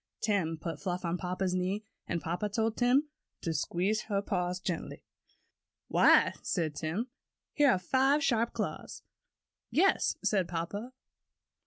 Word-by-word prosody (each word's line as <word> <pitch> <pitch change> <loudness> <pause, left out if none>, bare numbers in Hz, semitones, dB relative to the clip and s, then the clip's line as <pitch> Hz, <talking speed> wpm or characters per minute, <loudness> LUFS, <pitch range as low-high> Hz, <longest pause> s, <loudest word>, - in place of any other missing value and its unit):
Tim 190 -7 0
put 160 -1 -5
Fluff 180 -1 -2
on 170 +1 -1
papa's 185 0 -1
knee, 185 +4 -1 0.2
and 170 -3 -2
papa 175 +6 -2
told 220 +2 0
Tim 255 +5 +3 0.3
to 165 - -1
squeeze 185 +7 0
her 200 -1 +2
paw 180 -4 -1
gently 175 -3 -4 0.9
"Why," - - +5
said 165 -5 -1
Tim, 170 - -3 0.4
"here 290 -2 +5
are 245 - +4
five 265 +10 +2
sharp 235 -3 +2
claws." - - -5 0.7
"Yes," 385 +5 +3
said 190 -4 +2
papa. 190 +9 -4
190 Hz, 135 wpm, -31 LUFS, 175-225 Hz, 0.9 s, Why